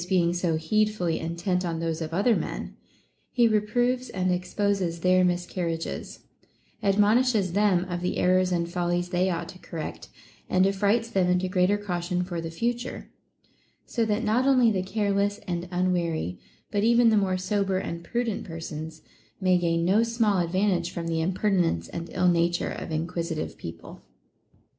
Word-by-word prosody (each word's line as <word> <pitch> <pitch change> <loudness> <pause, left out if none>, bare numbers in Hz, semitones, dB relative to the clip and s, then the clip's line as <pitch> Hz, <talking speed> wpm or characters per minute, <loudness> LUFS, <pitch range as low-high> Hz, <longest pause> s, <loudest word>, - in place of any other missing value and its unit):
427 180 0 +2 0.3
being - - -4
so 160 0 -14
needfully 210 -6 +1
intent 170 +3 -1
on 165 -2 -2
those 165 -1 -2
of 160 0 -4
other 205 +7 +3
men, - - -4 0.5
he 240 -2 +3
re 215 -1 +3
proves 245 +4 0
and 185 -1 0
exposes 180 -1 -1
their 185 +1 +4
miscarriages, 175 -2 -2 0.6
admonishes 210 0 +3
them 195 -3 +3
of 175 -1 -3
the 180 - -1
errors 185 0 +3
and 170 -1 0
follies 175 0 0
they 180 +1 +1
ought 170 -1 -2
to 185 - -11
correct, 165 -4 -7 0.4
and 185 0 +4
affrights 205 +4 +2
them 185 -2 +2
into 180 +1 +2
greater 185 +2 +2
caution 180 -3 -2
for 175 -2 -4
the 165 - -5
future; 240 +8 -3 0.7
so 235 - -1
that 215 0 0
not 235 +5 +2
only 255 -4 +5
the 190 -3 0
careless 200 +1 0
and 175 0 -3
unwary, 175 - -1 0.3
but 205 -1 0
even 235 +1 +5
the - - +4
more 190 -3 +2
sober 195 0 0
and 170 -2 -4
pru 240 +7 -1
dent 220 -4 -3
persons, 160 -1 -7 0.4
may 185 -2 +3
gain 170 -1 +1
no 195 +5 +4
small 230 -4 +1
advantage 180 0 +1
from 170 -2 -5
the 165 -1 -1
im 170 +4 +1
pertinence 180 - +1
and 170 0 -6
ill 180 - +2
nature 175 0 +2
of - - -6
inquisitive 165 0 -3
people. 85 0 -9
185 Hz, 165 wpm, -26 LUFS, 170-205 Hz, 0.7 s, only